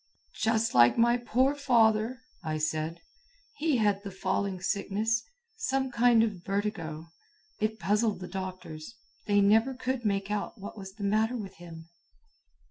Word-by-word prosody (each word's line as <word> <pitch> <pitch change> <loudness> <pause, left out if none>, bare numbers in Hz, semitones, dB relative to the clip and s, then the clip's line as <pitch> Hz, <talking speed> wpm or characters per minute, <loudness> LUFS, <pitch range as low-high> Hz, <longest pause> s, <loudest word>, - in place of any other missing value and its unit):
"Just 225 0 +1
like 120 0 +6
my 235 +1 +4
poor 250 +3 +2
father," 235 -3 +2 0.2
I 155 -1 -2
said. 155 +2 -2 0.6
"He 310 -7 +1
had 205 -3 +2
the 200 - -6
falling 190 0 -2
sickness. 210 +4 0 0.4
Some 270 - -1
kind 235 -2 +5
of 200 -6 -3
vertigo. 195 -6 -3 0.5
It 215 +1 -1
puzzled 210 +3 +1
the 180 - -6
doctors. 185 0 -7 0.3
They 205 -1 +4
never 220 +6 +4
could 255 -1 -2
make 200 -1 -1
out 210 +1 -3
what 200 - -8
was 195 -2 -9
the 210 - -7
matter 220 +4 +1
with 195 -4 -8
him." 165 -1 -11
210 Hz, 145 wpm, -29 LUFS, 190-230 Hz, 0.6 s, like